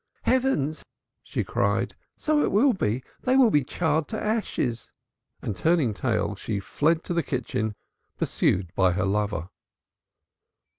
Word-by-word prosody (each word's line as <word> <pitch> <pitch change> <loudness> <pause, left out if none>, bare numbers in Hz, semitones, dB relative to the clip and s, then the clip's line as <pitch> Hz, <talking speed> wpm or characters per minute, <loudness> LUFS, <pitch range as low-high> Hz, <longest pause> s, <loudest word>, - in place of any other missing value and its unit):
"Heavens!" 250 - +1 0.4
she - - -3
cried, - - 0 0.2
"so 305 -1 +2
it - - +1
will 245 +7 +4
be. 125 - -1 0.2
They 255 +1 +3
will 250 -5 +6
be 145 -5 +4
charred 155 +2 0
to 220 - -4
ashes." 205 - -1 0.5
And 105 - -2
turning 155 - +2
tail, - - 0
she 105 -3 -3
fled 160 - +1
to - - -3
the 170 - +2
kitchen, 125 -7 -2 0.4
pursued 90 -2 0
by 95 -2 +3
her 90 +1 0
lover. 100 -3 -1
145 Hz, 140 wpm, -26 LUFS, -, 0.5 s, will